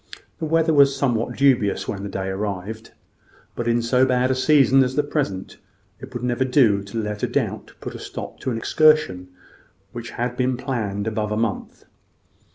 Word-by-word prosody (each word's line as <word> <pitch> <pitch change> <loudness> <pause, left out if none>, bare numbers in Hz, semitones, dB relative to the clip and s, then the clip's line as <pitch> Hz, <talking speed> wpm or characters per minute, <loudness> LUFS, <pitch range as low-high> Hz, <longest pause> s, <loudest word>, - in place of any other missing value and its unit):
The - - -2
weather 165 +1 +2
was 140 -2 +5
somewhat 120 -4 -1
dubious 125 -7 +2
when 100 - -4
the 100 - -5
day 95 0 -3
arrived: 100 +2 -4 0.7
but 120 - -3
in 120 0 +2
so 125 +2 +3
bad 130 0 +2
a - - +3
season 135 0 +4
as 130 0 -2
the 150 - +2
present, 135 -11 -3 0.4
it - - -10
would 120 - -6
never 125 +1 0
do 125 -6 +3
to 100 +3 -7
let 105 -1 -4
a - - +1
doubt - - -3
put - - -7
a - - -8
stop - - -8
to - - -3
an 115 - -2
excursion 155 -9 +3 0.6
which 120 0 -7
had 120 +1 -3
been 125 0 0
planned 110 -7 -3
above 110 -1 -2
a 105 - -1
month. 115 -2 -3
120 Hz, 185 wpm, -22 LUFS, 105-135 Hz, 0.7 s, was